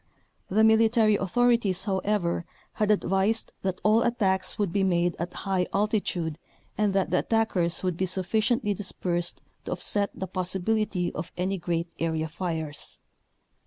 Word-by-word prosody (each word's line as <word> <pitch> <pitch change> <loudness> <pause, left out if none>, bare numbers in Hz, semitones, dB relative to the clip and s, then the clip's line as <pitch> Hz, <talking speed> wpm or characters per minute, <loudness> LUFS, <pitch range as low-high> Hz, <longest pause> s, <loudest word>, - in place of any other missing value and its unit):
The 215 +4 +3
military 220 0 +5
authorities, 220 -1 +2
however, 190 -3 0 0.3
had 210 -1 0
advised 205 +2 +1
that 190 -1 -2
all 215 +2 +4
attacks 195 -6 +1
would 200 -5 -1
be 200 - +2
made 175 -2 +1
at 170 +1 -3
high 190 -2 +1
altitude 195 -6 -1 0.4
and 210 -2 +1
that 195 - +1
the 180 - +3
attackers 195 -7 +1
would 180 -3 -1
be 190 - 0
suffi 185 +3 -1
ciently 215 -2 +1
dispersed 175 -3 -1 0.2
to - - -2
offset 200 -1 +1
the 190 - -4
possibility 185 0 -1
of 160 - -5
any 190 +2 -1
great 170 0 -1
area 160 -1 -1
fires. 160 -3 -4
190 Hz, 145 wpm, -27 LUFS, 175-215 Hz, 0.4 s, military